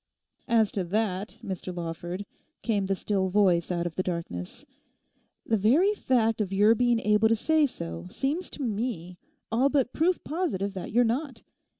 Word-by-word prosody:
'As 225 -4 +3
to 195 - -1
that, 200 +1 -2
Mr 185 -1 -4
Lawford,' 175 +3 -5 0.4
came 205 -4 0
the 195 - +1
still 190 -1 -1
voice 185 -4 +3
out 175 -1 -1
of 175 - -3
the 185 - -1
darkness; 170 - -5 0.8
'the 225 - +2
very 285 - +4
fact 225 - +1
of 195 -2 -2
your 205 +3 +5
being 240 0 +2
able 210 +1 +4
to 225 - +4
say 310 +6 +3
so 85 - -6
seems 295 - -2
to 290 - -6
me 205 -6 -3 0.3
all 250 +5 +3
but 270 -4 +1
proof 350 +3 +1
positive 275 - -2
that 185 - -6
you're 240 +3 +4
not. 245 +1 -2
210 Hz, 170 wpm, -27 LUFS, 185-245 Hz, 0.8 s, your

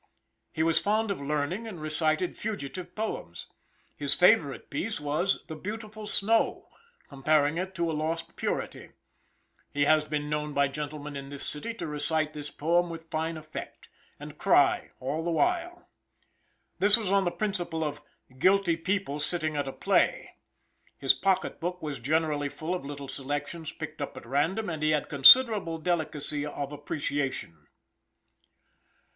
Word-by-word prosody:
He 160 - -1
was 165 0 +3
fond 215 +1 0
of 190 - -4
learning 150 +9 -2
and 190 -7 -8
reciting 155 +2 0
fugitive 180 -3 -6
poems. 220 0 -5 0.5
His - - +4
favorite - - +3
piece 225 - -2
was 150 +6 0
"The 160 - -7
Beautiful 215 +4 -7
Snow" 220 +2 +2 0.4
comparing 150 +3 +1
it 190 +1 -4
to 170 -2 0
a - - -3
lost 160 +2 -3
purity. - - -4 0.8
He 145 0 +1
has 155 0 +4
been 150 -1 -3
known 150 0 -2
by 140 -1 +2
gentlemen 150 +1 -6
in 140 0 -7
this 140 -1 +6
city 190 +10 -2
to - - -5
recite 155 +1 -1
this 150 -1 -5
poem 175 +3 +1
with 165 -1 -9
fine 160 +1 -2
effect, 155 0 -9 0.3
and - - -10
cry - - +3
all 145 +5 -3
the 170 - -2
while. 350 - 0 0.9
This 205 +3 +6
was 210 -5 -3
on 200 0 +4
the 175 - +1
principle 175 -5 -2
of 145 -1 -4 0.4
"guilty 185 -1 +3
people 185 -4 -2
sitting 155 0 0
at 145 -1 -1
a - - -3
play." - - +1 0.6
His 135 - +4
pocket 190 -1 0
book 180 +2 -3
was 145 -4 -4
generally 150 +2 0
full 160 +5 -4
of 180 - -3
little 140 0 -7
selections 145 +4 -2
picked 155 -1 -8
up 140 - -5
at - - -10
random, 160 - 0
and 160 -3 -4
he 155 - +2
had 150 - -1
considerable 190 - +7
delicacy 155 -3 -1
of 145 -1 -5
appreciation. 140 - -4
155 Hz, 155 wpm, -28 LUFS, 145-185 Hz, 0.9 s, considerable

